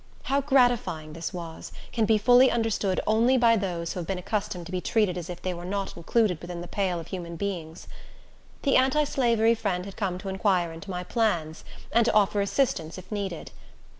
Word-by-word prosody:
How 275 Hz, +1 st, +1 dB
gratifying 245 Hz, -, +2 dB
this 165 Hz, +1 st, -5 dB
was, 170 Hz, -3 st, -7 dB, 0.2 s
can 225 Hz, -2 st, +2 dB
be 220 Hz, 0 st, +4 dB
fully 245 Hz, +4 st, +6 dB
understood 220 Hz, -5 st, 0 dB
only 230 Hz, +4 st, +3 dB
by 235 Hz, -2 st, +5 dB
those 175 Hz, -5 st, -2 dB
who -, -, -5 dB
have 170 Hz, -, -5 dB
been 195 Hz, -, -2 dB
accustomed 190 Hz, -1 st, -3 dB
to 175 Hz, -, -9 dB
be 185 Hz, -1 st, -2 dB
treated 210 Hz, -5 st, +1 dB
as 175 Hz, 0 st, -6 dB
if 175 Hz, -, -7 dB
they 185 Hz, -, -1 dB
were 175 Hz, 0 st, -7 dB
not 195 Hz, +2 st, -3 dB
included 180 Hz, 0 st, +1 dB
within 175 Hz, 0 st, -6 dB
the 175 Hz, -, -7 dB
pale 185 Hz, -3 st, -1 dB
of 165 Hz, -, -9 dB
human 170 Hz, -2 st, -5 dB
beings. 170 Hz, -3 st, -5 dB, 0.8 s
The 275 Hz, -, +4 dB
anti 265 Hz, +4 st, +3 dB
slavery 235 Hz, -5 st, +2 dB
friend 195 Hz, -5 st, -2 dB
had 200 Hz, -, -9 dB
come 190 Hz, -4 st, -1 dB
to 195 Hz, +1 st, -6 dB
inquire 190 Hz, -3 st, +1 dB
into 165 Hz, +5 st, -10 dB
my 180 Hz, -1 st, -3 dB
plans, 175 Hz, -7 st, -1 dB, 0.3 s
and 235 Hz, +2 st, +4 dB
to -, -, +2 dB
offer 205 Hz, -1 st, +3 dB
assistance, 200 Hz, -, 0 dB
if 185 Hz, -, -11 dB
needed. 195 Hz, -5 st, -4 dB
195 Hz, 200 wpm, -26 LUFS, 175-225 Hz, 0.8 s, fully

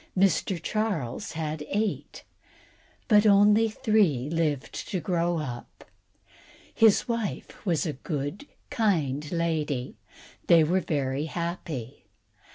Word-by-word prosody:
Mr. 190 Hz, -1 st, +2 dB
Charles 200 Hz, -, -2 dB
had 155 Hz, -1 st, -4 dB
eight, 210 Hz, +1 st, -2 dB, 0.8 s
but 210 Hz, -2 st, +5 dB
only 210 Hz, +2 st, +5 dB
three 195 Hz, -, +1 dB
lived 155 Hz, -5 st, -1 dB, 0.2 s
to 185 Hz, -, -1 dB
grow 170 Hz, 0 st, 0 dB
up. 125 Hz, -6 st, -7 dB, 0.9 s
His 225 Hz, +2 st, +4 dB
wife 230 Hz, -3 st, -4 dB
was 170 Hz, -2 st, +1 dB
a 155 Hz, -, -2 dB
good, 145 Hz, -, -5 dB, 0.2 s
kind 150 Hz, -, 0 dB
lady, 160 Hz, -6 st, -1 dB, 0.6 s
and -, -, -33 dB
they 165 Hz, -2 st, +7 dB
were 175 Hz, +5 st, +2 dB
very 140 Hz, -2 st, -1 dB
happy. 160 Hz, -7 st, -5 dB
170 Hz, 110 wpm, -27 LUFS, 150-205 Hz, 0.9 s, they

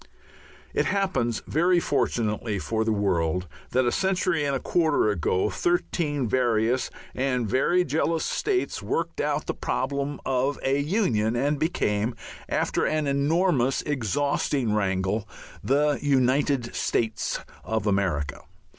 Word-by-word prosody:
It -, -, +1 dB
happens, 135 Hz, -, 0 dB
very 175 Hz, +3 st, +3 dB
fortunately 110 Hz, -8 st, 0 dB
for 110 Hz, +4 st, -1 dB
the 110 Hz, -, 0 dB
world, 90 Hz, -4 st, 0 dB, 0.2 s
that 130 Hz, +1 st, +2 dB
a 120 Hz, -, +2 dB
century 185 Hz, -3 st, +1 dB
and 140 Hz, -1 st, 0 dB
a -, -, -1 dB
quarter 155 Hz, -10 st, +2 dB
ago 95 Hz, +2 st, 0 dB
thirteen 150 Hz, -, 0 dB
various 120 Hz, 0 st, +1 dB, 0.2 s
and 125 Hz, -3 st, 0 dB
very 170 Hz, -, +2 dB
jealous 160 Hz, +2 st, 0 dB
states 385 Hz, -3 st, -1 dB
worked -, -, -2 dB
out -, -, -1 dB
the -, -, -2 dB
problem 140 Hz, +1 st, -2 dB
of 135 Hz, +2 st, 0 dB
a 135 Hz, +1 st, +2 dB
Union, 140 Hz, -, +1 dB
and 145 Hz, +4 st, 0 dB
became 115 Hz, -8 st, 0 dB, 0.3 s
after -, -, 0 dB
an 155 Hz, -1 st, +1 dB
enormous, 140 Hz, -1 st, +2 dB
exhausting 140 Hz, -2 st, 0 dB
wrangle 100 Hz, +1 st, 0 dB, 0.3 s
the 145 Hz, +2 st, +2 dB
United 135 Hz, -2 st, +2 dB
States 110 Hz, -1 st, -1 dB, 0.2 s
of 110 Hz, -2 st, -2 dB
America. 90 Hz, -8 st, 0 dB
130 Hz, 125 wpm, -26 LUFS, 110-150 Hz, 0.3 s, very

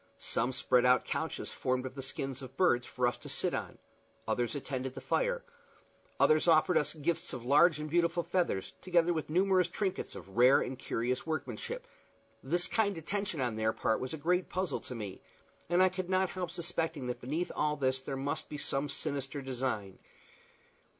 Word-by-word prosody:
Some 120 Hz, +3 st, 0 dB
spread 125 Hz, -1 st, +3 dB
out 125 Hz, 0 st, +4 dB
couches -, -, -3 dB
formed 130 Hz, 0 st, -1 dB
of 130 Hz, -, -5 dB
the 135 Hz, -, -6 dB
skins 135 Hz, 0 st, -4 dB
of 130 Hz, +1 st, -10 dB
birds 125 Hz, -10 st, +3 dB
for 125 Hz, -2 st, -1 dB
us 120 Hz, -, 0 dB
to -, -, -9 dB
sit -, -, 0 dB
on; -, -, -4 dB, 0.5 s
others 120 Hz, +3 st, 0 dB
attended 130 Hz, -2 st, -3 dB
to -, -, -25 dB
the -, -, -6 dB
fire; -, -, +1 dB, 0.8 s
others 155 Hz, +2 st, +4 dB
offered 165 Hz, +2 st, +5 dB
us 150 Hz, -, +1 dB
gifts 165 Hz, +3 st, -2 dB
of 125 Hz, -2 st, -6 dB
large 150 Hz, +5 st, +6 dB
and 150 Hz, -, -3 dB
beautiful 170 Hz, +2 st, +2 dB
feathers, 170 Hz, -, -1 dB
together 175 Hz, -1 st, +3 dB
with 160 Hz, -2 st, -3 dB
numerous 185 Hz, +1 st, +3 dB
trinkets 190 Hz, +1 st, -3 dB
of 95 Hz, -, -10 dB
rare 125 Hz, +3 st, +7 dB
and 130 Hz, 0 st, -3 dB
curious 125 Hz, +5 st, -2 dB
workmanship. 135 Hz, -8 st, -3 dB, 0.6 s
This 175 Hz, +6 st, 0 dB
kind 205 Hz, -4 st, +1 dB
attention 175 Hz, -1 st, -2 dB
on 120 Hz, -3 st, 0 dB
their 110 Hz, 0 st, +1 dB
part 110 Hz, 0 st, +1 dB
was 130 Hz, +4 st, -3 dB
a -, -, -7 dB
great 180 Hz, +4 st, +1 dB
puzzle 185 Hz, -5 st, -1 dB
to 125 Hz, -, -7 dB
me, 105 Hz, -4 st, -6 dB, 0.5 s
and 175 Hz, +2 st, +5 dB
I 185 Hz, -, +6 dB
could 185 Hz, 0 st, -4 dB
not 185 Hz, 0 st, +2 dB
help 180 Hz, -2 st, -3 dB
suspecting 165 Hz, -4 st, -2 dB
that 125 Hz, 0 st, -4 dB
beneath 155 Hz, +8 st, -2 dB
all 150 Hz, 0 st, +1 dB
this 130 Hz, -2 st, 0 dB
there 135 Hz, 0 st, -4 dB
must 140 Hz, +2 st, -3 dB
be 150 Hz, -, -5 dB
some 140 Hz, 0 st, -2 dB
sinister 140 Hz, 0 st, -3 dB
design. 120 Hz, -7 st, -3 dB
145 Hz, 190 wpm, -32 LUFS, 130-175 Hz, 0.8 s, rare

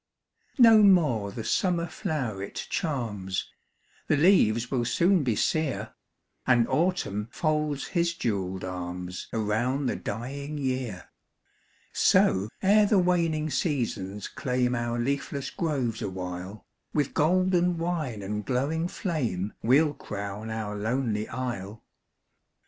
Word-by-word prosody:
No 225 Hz, -4 st, +8 dB
more 150 Hz, -, +4 dB
the 115 Hz, -, -6 dB
summer 175 Hz, -, +1 dB
floweret 135 Hz, -, -4 dB
charms, 110 Hz, -, -2 dB, 0.6 s
The 155 Hz, -, +3 dB
leaves 125 Hz, -, +4 dB
will 125 Hz, -3 st, +1 dB
soon 175 Hz, +9 st, +3 dB
be 120 Hz, -5 st, +1 dB
sere, 155 Hz, +2 st, -1 dB, 0.5 s
And 120 Hz, -2 st, +4 dB
Autumn 130 Hz, -, 0 dB
folds 150 Hz, -2 st, -1 dB
his 170 Hz, -2 st, +1 dB
jewelled 95 Hz, -, -2 dB
arms 90 Hz, 0 st, -5 dB
Around 115 Hz, +6 st, 0 dB
the -, -, 0 dB
dying 140 Hz, +7 st, -5 dB
year; 130 Hz, -8 st, -3 dB, 0.8 s
So, 95 Hz, +3 st, +3 dB
ere 205 Hz, +2 st, +5 dB
the 205 Hz, -, +3 dB
waning 165 Hz, -4 st, +1 dB
seasons 115 Hz, -, -2 dB
claim 125 Hz, -1 st, -1 dB
Our 120 Hz, -1 st, -1 dB
leafless 140 Hz, +2 st, -2 dB
groves 135 Hz, -, -1 dB
awhile, 95 Hz, +2 st, -5 dB, 0.3 s
With 145 Hz, -3 st, +1 dB
golden 180 Hz, +2 st, +2 dB
wine 160 Hz, -, -2 dB
and 105 Hz, +2 st, -3 dB
glowing 140 Hz, -, 0 dB
flame 120 Hz, -, -2 dB
We 130 Hz, +5 st, +5 dB
'll 150 Hz, -2 st, -1 dB
crown 100 Hz, -2 st, -6 dB
our 110 Hz, -2 st, -3 dB
lonely 110 Hz, 0 st, -1 dB
isle. 115 Hz, -4 st, -5 dB
130 Hz, 115 wpm, -27 LUFS, 105-160 Hz, 0.8 s, No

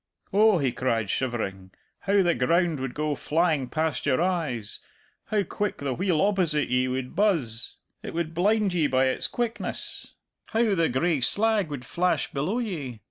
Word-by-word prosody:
'Oh,' 210 Hz, 0 st, +5 dB
he 135 Hz, -5 st, +1 dB
cried, 115 Hz, -5 st, -1 dB
shivering, 100 Hz, -7 st, -3 dB, 0.3 s
'how 200 Hz, 0 st, +2 dB
the 175 Hz, -1 st, +3 dB
ground 165 Hz, +4 st, +1 dB
would 130 Hz, -2 st, -4 dB
go 150 Hz, 0 st, 0 dB
flying 155 Hz, -3 st, +1 dB
past 160 Hz, -1 st, -1 dB
your 130 Hz, -2 st, +3 dB
eyes; 160 Hz, -, -1 dB, 0.5 s
how 210 Hz, -2 st, +1 dB
quick 205 Hz, +1 st, -3 dB
the 140 Hz, -2 st, -2 dB
wheel 175 Hz, 0 st, +1 dB
opposite 180 Hz, -7 st, +1 dB
ye 125 Hz, +1 st, +2 dB
would 130 Hz, +3 st, -3 dB
buzz 155 Hz, -, +1 dB, 0.3 s
it -, -, -7 dB
would 165 Hz, -1 st, -2 dB
blind 200 Hz, +3 st, +2 dB
ye 165 Hz, -4 st, +2 dB
by 130 Hz, -1 st, +2 dB
its 130 Hz, -, +1 dB
quickness; 235 Hz, -1 st, -4 dB, 0.3 s
how 225 Hz, -2 st, +2 dB
the 165 Hz, -3 st, +2 dB
gray 145 Hz, +3 st, +1 dB
slag 210 Hz, -, +2 dB
would 140 Hz, -4 st, -6 dB
flash 180 Hz, +7 st, 0 dB
below 150 Hz, -, -1 dB
ye!' 155 Hz, -, -4 dB
160 Hz, 165 wpm, -26 LUFS, 130-190 Hz, 0.5 s, Oh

